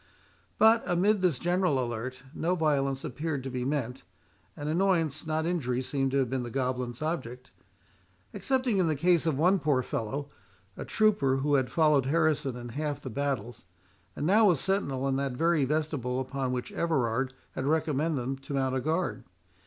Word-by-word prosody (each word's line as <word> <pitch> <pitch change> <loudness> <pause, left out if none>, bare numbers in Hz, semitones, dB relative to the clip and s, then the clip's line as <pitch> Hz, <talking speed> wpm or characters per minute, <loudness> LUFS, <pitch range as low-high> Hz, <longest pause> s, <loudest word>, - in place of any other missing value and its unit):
But 225 +1 +6
amid 195 +4 +2
this 175 -7 +2
general 175 -1 +1
alerte, 125 +1 -4
no 175 +3 0
violence 140 -5 0
appeared 145 0 -3
to 135 - -5
be 125 -1 -3
meant, 130 -3 -2 0.6
and 145 - -5
annoyance, 165 -3 +1
not 160 0 0
injury, 140 -8 -1
seemed 135 0 -1
to 135 - 0
have 135 -2 +2
been 130 +1 -2
the 120 - -5
goblins' 125 0 -2
object, 130 -6 -4 0.8
excepting 255 -6 +1
in 180 - +3
the 155 - +1
case 170 +2 +2
of 155 -4 +1
one 180 +6 +4
poor 140 -4 +1
fellow, 140 +6 -4 0.4
a - - -6
trooper, 200 -12 +2
who 145 +2 0
had 130 -3 +2
followed 150 -5 +3
Harrison 150 -3 +1
in 120 0 -7
half 145 +3 -3
his 130 - -6
battles, 125 -7 -3 0.5
and 145 - -3
now 210 +6 +5
was 175 -8 +4
sentinel 140 -9 0
in 135 -1 +1
that 135 -1 -1
very 165 +1 +2
vestibule 145 -4 -1
upon 130 0 -2
which 125 -1 -3
Everard 130 -5 0 0.2
had 130 - -3
recommended 155 -1 +1
them 130 +2 -3
to 135 +1 -8
mount 130 -1 0
a 130 - 0
guard. 160 -3 -1
140 Hz, 175 wpm, -29 LUFS, 130-165 Hz, 0.8 s, But